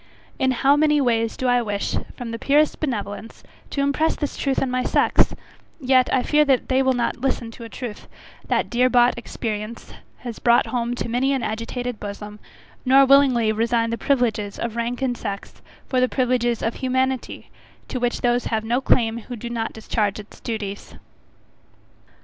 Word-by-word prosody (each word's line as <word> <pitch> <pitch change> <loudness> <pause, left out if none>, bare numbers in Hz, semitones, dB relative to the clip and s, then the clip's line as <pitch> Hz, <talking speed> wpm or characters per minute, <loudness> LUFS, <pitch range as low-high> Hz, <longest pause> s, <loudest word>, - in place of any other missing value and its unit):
In 260 - +2
how 270 +3 +3
many 300 0 +3
ways 230 -4 +1
do 260 - -3
I 245 0 +3
wish, 205 -3 -2 0.2
from 240 -2 -5
the 230 - -5
purest 295 +4 +2
benevolence, 225 -6 -4 0.3
to 280 - -2
impress 280 +3 +1
this 290 - -3
truth 275 -2 0
on 265 - -1
my 255 0 0
sex; - - +2 0.4
yet 255 -2 +3
I 255 - +2
fear 300 0 +4
that 270 -4 +1
they 260 0 +3
will 265 -1 +3
not 240 -1 -1
listen 250 -3 -1
to 230 +1 -10
a - - -9
truth, 235 -3 -7 0.4
that - - +1
dear 250 +1 +3
bought 245 0 +4
experience 225 -2 -5 0.2
has 240 -3 -7
brought 235 0 +4
home 245 -1 -2
to 240 - -3
many 250 +4 +1
an 265 - -1
agitated 230 +2 -4
bosom, 210 +1 -7 0.4
nor 270 +1 +6
willingly 260 -5 +5
resign 230 +1 +1
the - - 0
privileges 225 -7 0
of 230 -1 -4
rank 240 +2 -2
and 250 -2 0
sex 200 -4 -6 0.3
for 255 - +1
the 255 - +3
privileges 245 -2 0
of 225 - 0
humanity, 260 0 -2 0.4
to 255 - -3
which 245 0 -1
those 245 0 +1
have 220 -1 -1
no 240 +4 0
claim 230 -3 +2
who 245 +2 -8
do 235 +1 -7
not 225 -1 -2
discharge 215 -2 -1
its 210 - -12
duties. 205 -3 -5
245 Hz, 180 wpm, -22 LUFS, 225-260 Hz, 0.4 s, nor